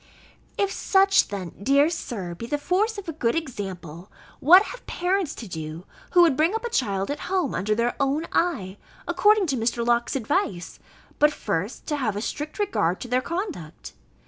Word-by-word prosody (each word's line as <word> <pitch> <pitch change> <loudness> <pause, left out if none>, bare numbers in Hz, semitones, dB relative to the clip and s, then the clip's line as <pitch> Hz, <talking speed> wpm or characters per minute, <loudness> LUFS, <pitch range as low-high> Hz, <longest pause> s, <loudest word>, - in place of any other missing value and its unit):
If 400 -1 +1
such 390 0 +3
then, 190 -4 -5
dear 280 +6 +4
Sir, 200 - -5
be 230 +7 -7
the 295 - -1
force 405 +9 0
of 405 - -7
a 325 - -3
good 235 -6 0
example, 190 - -6 0.3
what 360 +7 +8
have - - -9
parents 360 -2 -1
to 230 - -8
do, 160 0 -6 0.3
who 350 -1 +7
would 325 -6 +4
bring 320 +8 +2
up 450 - -3
a 475 - -3
child 200 - 0
at 290 - -4
home 370 -8 0
under 215 +3 0
their 235 +2 0
own 280 +4 +1
eye, 205 - 0 0.3
according 405 +4 +4
to 275 -6 -1
Mr. 235 +1 0
Locke's 235 +1 +1
advice, 225 - -2 0.4
but, 300 +1 +5
first, 205 - -3
to 295 - -1
have 225 -7 -1
a 205 - -3
strict 295 +4 -5
regard 285 - 0
to - - -5
their 250 +1 +1
conduct! 335 - -5
275 Hz, 185 wpm, -25 LUFS, -, 0.4 s, what